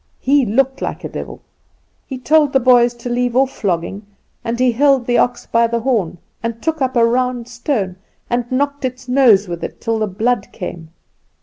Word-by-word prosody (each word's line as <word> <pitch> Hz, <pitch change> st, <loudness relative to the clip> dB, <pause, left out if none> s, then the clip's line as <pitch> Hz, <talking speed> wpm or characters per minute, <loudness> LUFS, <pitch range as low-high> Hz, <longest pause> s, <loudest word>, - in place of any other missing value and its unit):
He 275 Hz, -2 st, +2 dB
looked 265 Hz, +5 st, +1 dB
like -, -, -4 dB
a -, -, -4 dB
devil. -, -, -8 dB, 0.6 s
"He 265 Hz, -, -5 dB
told 295 Hz, +3 st, +3 dB
the 270 Hz, -, +5 dB
boys 245 Hz, -1 st, +4 dB
to 235 Hz, +1 st, -8 dB
leave 245 Hz, 0 st, -1 dB
off 265 Hz, +1 st, +3 dB
flogging, 195 Hz, +2 st, -3 dB, 0.4 s
and 235 Hz, +1 st, -3 dB
he 255 Hz, -1 st, +3 dB
held 270 Hz, +1 st, +3 dB
the 240 Hz, 0 st, +2 dB
ox 245 Hz, 0 st, 0 dB
by 230 Hz, 0 st, +2 dB
the 235 Hz, 0 st, -2 dB
horn, 220 Hz, -9 st, 0 dB, 0.2 s
and 230 Hz, 0 st, -4 dB
took 320 Hz, +3 st, -2 dB
up 260 Hz, 0 st, 0 dB
a 235 Hz, -1 st, +5 dB
round 245 Hz, 0 st, 0 dB
stone 240 Hz, -6 st, -2 dB, 0.3 s
and 240 Hz, 0 st, -2 dB
knocked 285 Hz, +2 st, -1 dB
its 255 Hz, 0 st, -4 dB
nose 245 Hz, -6 st, +4 dB
with 170 Hz, -1 st, -6 dB
it -, -, -6 dB
till 225 Hz, -1 st, -1 dB
the 215 Hz, -, 0 dB
blood 225 Hz, +6 st, -1 dB
came. 175 Hz, -4 st, -7 dB
245 Hz, 195 wpm, -18 LUFS, 230-260 Hz, 0.6 s, the